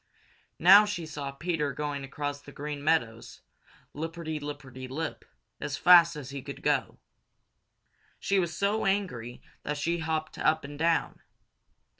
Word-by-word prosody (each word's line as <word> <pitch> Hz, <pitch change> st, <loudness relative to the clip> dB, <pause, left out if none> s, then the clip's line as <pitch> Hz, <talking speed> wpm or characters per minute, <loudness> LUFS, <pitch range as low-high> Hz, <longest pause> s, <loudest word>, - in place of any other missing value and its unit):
Now 195 Hz, +5 st, +9 dB
she 185 Hz, -5 st, -4 dB
saw 145 Hz, -3 st, -5 dB
Peter 150 Hz, -1 st, -2 dB
going 145 Hz, 0 st, -3 dB
across 145 Hz, +1 st, -4 dB
the 145 Hz, -, -12 dB
Green 145 Hz, 0 st, -6 dB
Meadows, 115 Hz, -8 st, 0 dB, 0.5 s
lipperty 160 Hz, 0 st, -4 dB
lipperty 135 Hz, -3 st, -7 dB
lip, 155 Hz, +4 st, -4 dB, 0.3 s
as 145 Hz, -, -3 dB
fast 170 Hz, -2 st, +7 dB
as 140 Hz, -3 st, -7 dB
he 140 Hz, -1 st, -5 dB
could -, -, -9 dB
go. -, -, 0 dB, 1.2 s
She 195 Hz, 0 st, +1 dB
was 170 Hz, -2 st, -2 dB
so 200 Hz, +1 st, +1 dB
angry 145 Hz, -, -2 dB, 0.2 s
that 150 Hz, 0 st, -3 dB
she 170 Hz, +3 st, -1 dB
hopped 160 Hz, -1 st, -3 dB
up 160 Hz, 0 st, +2 dB
and 145 Hz, +1 st, -9 dB
down. 165 Hz, 0 st, +1 dB
150 Hz, 140 wpm, -29 LUFS, 140-170 Hz, 1.2 s, Now